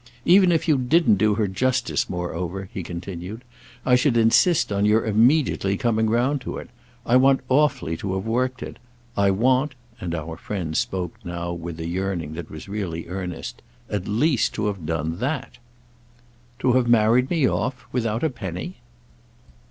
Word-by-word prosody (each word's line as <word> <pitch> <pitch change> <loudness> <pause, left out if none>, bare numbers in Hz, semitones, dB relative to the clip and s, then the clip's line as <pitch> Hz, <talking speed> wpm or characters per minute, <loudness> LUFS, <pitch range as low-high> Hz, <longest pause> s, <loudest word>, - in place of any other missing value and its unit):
"Even 185 +1 +6
if 165 -1 +1
you 150 -4 +3
didn't 125 - +3
do 105 +1 +3
her 105 -1 +1
justice, 125 +7 0
moreover," 90 +2 -4
he 95 - -4
continued, 90 +5 -7 0.4
"I 125 - +3
should 125 -1 +2
insist 115 - +4
on 100 0 +1
your 105 +2 +3
immediately 110 -2 +2
coming 110 -1 +1
round 125 +5 +1
to - - -5
it. - - -9 0.3
I 120 - +4
want 135 +1 +4
awfully 135 - +2
to 95 +2 -3
have 95 +2 -3
worked 125 +3 -1
it. - - -8 0.4
I 100 0 +3
want"—and 120 - 0
our 80 0 -5
friend 85 -5 -4
spoke 95 -7 -1
now 85 0 -4
with 85 -1 -6
a 80 - -4
yearning 90 -3 -3
that 85 0 -7
was 80 +4 -9
really 95 -6 -4
earnest—"at 90 +2 -6
least 130 +5 +1
to 110 - -1
have 100 -7 -3
done 80 +1 -2
that." 135 0 -3 1.0
"To 125 - +3
have 125 -1 +3
married 120 +2 +4
me 160 -7 +2
off—without 125 -3 -2
a 160 - +1
penny?" 95 - -6
110 Hz, 160 wpm, -23 LUFS, 90-130 Hz, 1.0 s, Even